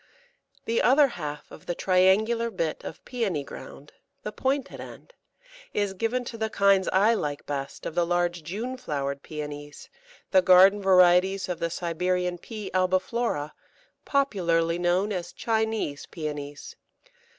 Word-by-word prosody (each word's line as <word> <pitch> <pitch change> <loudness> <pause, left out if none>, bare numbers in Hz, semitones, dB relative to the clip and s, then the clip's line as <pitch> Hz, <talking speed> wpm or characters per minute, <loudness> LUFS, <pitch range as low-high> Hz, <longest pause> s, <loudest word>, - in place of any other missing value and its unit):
The 230 0 +1
other 275 +2 +5
half 150 -8 -7
of - - -13
the 175 - -2
triangular 200 +7 +3
bit 170 -7 -3
of - - -9
Pæony 200 - -2
ground 140 +1 -11 0.3
the 210 - -4
pointed 270 +4 -2
end - - -11 0.6
is 205 -2 0
given 230 +6 -1
to 230 -1 -7
the 220 0 -1
kinds 200 -2 +3
I 205 +5 +4
like 145 -9 -3
best 140 -1 -5
of - - -4
the 175 +1 +2
large 175 0 0
June 220 +11 -5
flowered 140 - -3
Pæonies, 145 -1 -8 0.4
the 185 - +6
garden 190 +3 +6
varieties 185 0 +4
of 180 -2 -4
the 170 0 -1
Siberian 180 +1 -1
P. 215 +1 -7
albiflora, 185 -3 0 0.5
popularly 175 - +1
known 180 +4 +1
as 180 -3 -4
Chinese 220 -10 -1
Pæonies. 145 -3 -6
185 Hz, 140 wpm, -26 LUFS, 165-220 Hz, 0.6 s, the